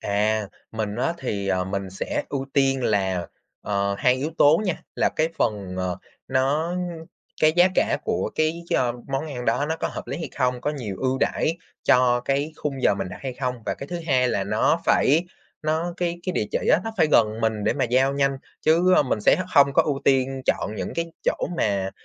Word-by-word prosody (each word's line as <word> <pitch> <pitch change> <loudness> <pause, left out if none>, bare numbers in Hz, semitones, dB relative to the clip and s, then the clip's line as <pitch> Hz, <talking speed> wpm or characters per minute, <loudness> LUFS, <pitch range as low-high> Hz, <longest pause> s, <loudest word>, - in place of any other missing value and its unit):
À, 105 +1 0 0.3
mình 110 -1 -3
á 135 +7 0
thì, 100 -10 -3
ờ, 95 -1 +1
mình 95 0 -4
sẽ 95 - -3
ưu 135 -1 -3
tiên 135 -2 +2
là, 95 -4 0 0.4
ờ, 100 0 0
hai 125 0 +4
yếu 140 +5 -3
tố 150 +6 +6
nha. 185 - -2
Là - - +2
cái 160 +1 +2
phần, 100 -4 -1
ờ, 90 -1 -2 0.3
nó 145 +6 +1 0.7
cái 155 0 +5
giá 175 +1 +6
cả - - +2
của 220 - -1
cái 160 +2 0
cho 120 -2 +1 0.2
món 135 +3 -2
ăn 125 -5 -5
đó 145 - +1
nó 160 +1 -1
có - - -2
hợp - - -7
lý 135 - -4
hay 165 - -4
không? 125 -2 +1
Có 145 - -1
nhiều 120 -10 -5
ưu 130 0 0
đãi 165 +4 0 0.3
cho 125 -1 +4
cái 140 +4 0
khung 135 -3 -4
giờ - - +4
mình 95 -1 -4
đặt 90 - -8
hay 130 -2 -3
không? 125 -1 -2
Và - - 0
cái 140 - -8
thứ 175 +3 -4
hai 130 -3 +3
là 100 -5 0
nó 105 +2 +2
phải 155 +6 +4 0.4
nó 160 +3 -1
cái 175 -1 -2
cái 185 - -2
địa - - 0
chỉ - - 0
á - - +4
nó 225 - -2
phải 160 -4 +4
gần 110 0 +3
mình 110 -2 0
để - - +3
mà 135 - 0
giao 130 +3 +2
nhanh 140 -1 +1 0.2
chứ, 170 +4 +4
ơ, - - +5
mình 125 -6 -1
sẽ - - +5
h 185 - -3
hông 140 -1 +6
có - - +6
ưu 140 -3 -2
tiên 135 0 +2
chọn 105 - 0
những - - -4
cái 170 0 -1 0.2
chỗ - - +2 0.2
mà, 100 -5 0
130 Hz, 225 wpm, -24 LUFS, 105-155 Hz, 0.7 s, tố